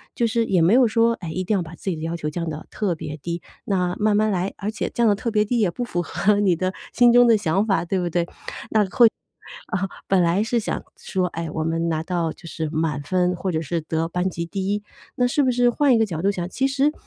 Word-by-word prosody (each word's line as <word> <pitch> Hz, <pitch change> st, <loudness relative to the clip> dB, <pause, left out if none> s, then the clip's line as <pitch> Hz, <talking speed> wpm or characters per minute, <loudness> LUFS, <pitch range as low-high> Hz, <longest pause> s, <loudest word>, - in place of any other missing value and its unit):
就 235 Hz, -, +1 dB
是 230 Hz, +1 st, +1 dB
也 185 Hz, -5 st, +2 dB
没 170 Hz, +5 st, +4 dB
有 250 Hz, 0 st, +6 dB
说， 230 Hz, +1 st, +3 dB
哎， 175 Hz, -7 st, -7 dB
一 185 Hz, +3 st, -2 dB
定 195 Hz, -, -1 dB
要 190 Hz, -, +1 dB
把 165 Hz, 0 st, -8 dB
自 190 Hz, -, -5 dB
己 180 Hz, -, -1 dB
的 -, -, -8 dB
要 165 Hz, +1 st, -2 dB
求 150 Hz, -2 st, -3 dB
降 165 Hz, +1 st, -3 dB
到 155 Hz, 0 st, -6 dB
特 195 Hz, -5 st, -1 dB
别 150 Hz, -1 st, -6 dB
低， 170 Hz, +3 st, -5 dB, 0.2 s
那 180 Hz, -3 st, 0 dB
慢 210 Hz, -1 st, +3 dB
慢 215 Hz, +1 st, +2 dB
来， 185 Hz, 0 st, -1 dB
而 210 Hz, +1 st, -3 dB
且 215 Hz, -, -3 dB
降 235 Hz, -1 st, +1 dB
得 205 Hz, -, +3 dB
特 230 Hz, +4 st, -3 dB
别 210 Hz, -2 st, +2 dB
低， 235 Hz, +3 st, 0 dB
也 205 Hz, -5 st, +3 dB
不 245 Hz, -, -4 dB
符 175 Hz, -7 st, -2 dB
合 205 Hz, +4 st, +1 dB
你 195 Hz, -4 st, +3 dB
的 185 Hz, +3 st, -2 dB, 0.2 s
心 240 Hz, 0 st, +6 dB
中 245 Hz, 0 st, +6 dB
的 230 Hz, -2 st, +6 dB
想 195 Hz, +1 st, +1 dB
法， 195 Hz, -6 st, +1 dB
对 185 Hz, +2 st, -1 dB
不 175 Hz, -1 st, -1 dB
对？ 170 Hz, 0 st, 0 dB, 1.5 s
那 185 Hz, -, 0 dB
或 195 Hz, -, 0 dB
啊， -, -, -7 dB, 0.2 s
本 190 Hz, -1 st, +3 dB
来 175 Hz, +4 st, +2 dB
是 235 Hz, +2 st, 0 dB
想 220 Hz, -, -3 dB
说， 185 Hz, -2 st, -1 dB
哎， 170 Hz, -2 st, -5 dB
我 160 Hz, -, -2 dB
们 165 Hz, +1 st, -1 dB
拿 160 Hz, -1 st, -1 dB
到 170 Hz, -2 st, -1 dB
就 170 Hz, -, -14 dB
是 160 Hz, 0 st, -4 dB
满 155 Hz, -2 st, -1 dB
分 180 Hz, +4 st, +1 dB
或 185 Hz, +2 st, -3 dB
者 160 Hz, -1 st, -1 dB
是 165 Hz, +2 st, -2 dB
得 160 Hz, +1 st, -2 dB
班 180 Hz, +2 st, -1 dB
级 170 Hz, -1 st, -4 dB
第 190 Hz, +2 st, -3 dB
1， 205 Hz, 0 st, -3 dB, 0.3 s
那 250 Hz, -, +2 dB
是 245 Hz, +4 st, +2 dB
不 260 Hz, -2 st, +3 dB
是 245 Hz, 0 st, +3 dB
换 270 Hz, +1 st, +3 dB
一 -, -, +4 dB
个 225 Hz, -, +3 dB
角 165 Hz, -6 st, -4 dB
度 200 Hz, +3 st, +2 dB
想， 180 Hz, -3 st, -4 dB
其 265 Hz, +7 st, 0 dB
实， 275 Hz, +2 st, +2 dB
185 Hz, 290 characters per minute, -23 LUFS, 170-215 Hz, 1.5 s, 有